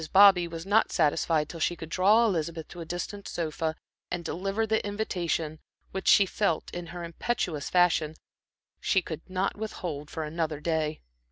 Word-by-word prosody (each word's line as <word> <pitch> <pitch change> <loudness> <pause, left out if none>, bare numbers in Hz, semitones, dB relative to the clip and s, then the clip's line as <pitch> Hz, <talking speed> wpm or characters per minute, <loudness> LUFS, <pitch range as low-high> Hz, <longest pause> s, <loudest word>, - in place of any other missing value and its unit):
Bobby 195 -3 +7
was 165 0 -7
not 205 +3 +3
satisfied 155 0 +2
till 165 - -8
she 175 - +1
could 160 -1 -8
draw 205 +7 +5
Elizabeth 165 -5 -1
to 175 - -8
a - - -5
distant 180 +4 -5
sofa, 160 -1 -2 0.3
and 175 -1 -4
deliver 195 +5 -1
the 220 0 +1
invitation 175 -7 -2 0.3
which 190 - -4
she 200 - +7
felt, 185 -3 -1
in 175 -1 -5
her 175 +1 -7
impetuous 170 -3 -2
fashion, 170 -3 +3 0.6
she 190 -2 +2
could 160 -2 -5
not 185 +1 0
withhold 170 -9 -5
for 160 - -4
another 155 -1 -2
day. 155 -1 -1
170 Hz, 165 wpm, -28 LUFS, 160-195 Hz, 0.6 s, Bobby